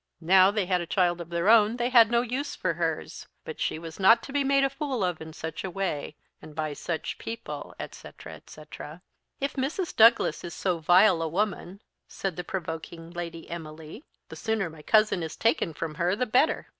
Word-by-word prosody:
Now 185 +3 +6
they 205 -2 0
had 180 -1 +1
a 170 - -6
child 175 -1 +1
of 170 - -9
their 170 +2 -1
own, 220 0 +6
they 240 0 0
had 235 -3 +7
no 235 0 +3
use 255 +4 -3
for - - -1
hers; - - -3 0.2
but 470 -1 -7
she - - -1
was 165 +1 -9
not 225 +5 +6
to 275 - -9
be 285 -1 +2
made 275 0 +3
a 275 - +3
fool 275 -7 -2
of 180 -3 -2
in 160 0 -8
such 160 0 -6
a 190 - -3
way, 175 -6 -3 0.3
and 150 - -12
by 155 -1 -2
such 160 +2 -4
people, 220 -11 -7
etc. - - -9
etc. 155 +2 -11 0.4
"If 280 +1 -2
Mrs. 295 +7 -3
Douglas 230 +2 +5
is 170 -1 -7
so 180 -3 -1
vile 175 +2 +5
a 165 - -1
woman," 200 +2 -3 0.2
said 195 -4 -4
the 180 - -5
provoking 165 -2 -6
Lady 170 -1 -6
Emily, 160 - -8 0.3
"the - - -9
sooner 220 -6 -2
my 155 -1 -13
cousin 215 +1 +3
is 160 -1 -5
taken 225 -6 +1
from 160 0 -5
her 180 +3 +2
the 250 - 0
better." 255 +7 +2
185 Hz, 205 wpm, -27 LUFS, 165-230 Hz, 0.4 s, had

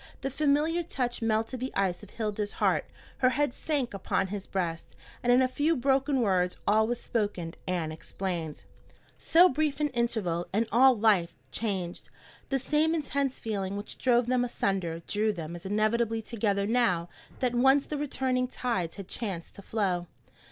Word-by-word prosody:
The 270 0 -2
familiar 300 +4 +2
touch 250 -8 -3
melted 225 +3 0
the 260 +2 -3
ice 185 -3 0
of 210 - -12
Hilda's 210 -2 -3
heart, - - +1 0.3
her 255 - +5
head 280 0 0
sank 280 -7 -1
upon 190 -1 -1
his 200 -1 -5
breast, 170 -4 -3 0.3
and 245 - +2
in 250 +1 +6
a - - +3
few 295 +5 +1
broken 270 +1 +2
words 185 -4 +1
all 220 +1 +4
was 240 0 -1
spoken 205 -9 -2
and 170 -4 -1
explained. 165 -2 -5 0.6
So 345 +3 +6
brief 300 -1 0
an 300 -1 +1
interval 220 -9 -1
and 220 +4 +1
all 255 +1 +6
life 205 -6 +3 0.2
changed! 190 -6 -3 0.4
The 270 - +2
same 300 +5 +2
intense 280 -3 -1
feeling 200 -3 -3
which 205 - -7
drove 245 -1 +3
them 250 0 +2
asunder 185 -8 -1
drew 215 +1 +1
them 170 -4 -6
as 175 +2 -7
inevitably 220 +2 +1
together 205 -3 0
now 200 -7 +2 0.3
that 250 -2 +1
once 265 +3 +4
the 300 - -4
returning 260 -3 0
tides 230 -10 -2
had 195 -3 -8
chance 190 -7 -4
to - - -12
flow. 190 -5 -1
225 Hz, 165 wpm, -29 LUFS, 190-260 Hz, 0.6 s, in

